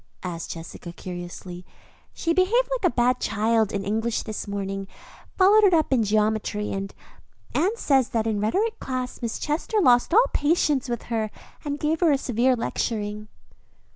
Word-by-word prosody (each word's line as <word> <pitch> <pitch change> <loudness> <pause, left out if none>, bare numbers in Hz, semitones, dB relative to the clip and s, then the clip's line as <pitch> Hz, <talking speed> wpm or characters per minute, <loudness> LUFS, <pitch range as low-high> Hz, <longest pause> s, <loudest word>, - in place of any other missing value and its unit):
asked 170 -2 -5
Jessica 165 +1 -9
curiously. 175 0 -8 0.5
"She 335 - -1
behaved 420 +8 +3
like 480 -8 +2
a - - -27
bad 250 +1 +2
child 220 0 +1
in 200 -1 -3
English 220 +3 -1
this 215 -2 -5
morning, 195 -1 -4 0.5
followed 405 +3 +6
it 380 -4 +6
up 310 -4 +2
in 250 - +3
geometry; 210 0 0
and 195 0 -4 0.6
Anne 390 +7 +1
says 270 - +2
that 225 -4 0
in 220 -2 0
rhetoric 420 - 0
class 255 -1 -4
Miss 235 -2 -2
Chester 320 +9 -1
lost 245 -7 +4
all 455 +7 +6
patience 290 -4 +1
with 240 -1 -3
her 220 -1 0 0.3
and 290 0 -3
gave 310 +2 0
her 340 -3 +4
a 280 - +3
severe 250 0 +1
lecturing." 210 -2 -3
235 Hz, 165 wpm, -24 LUFS, 210-310 Hz, 0.6 s, followed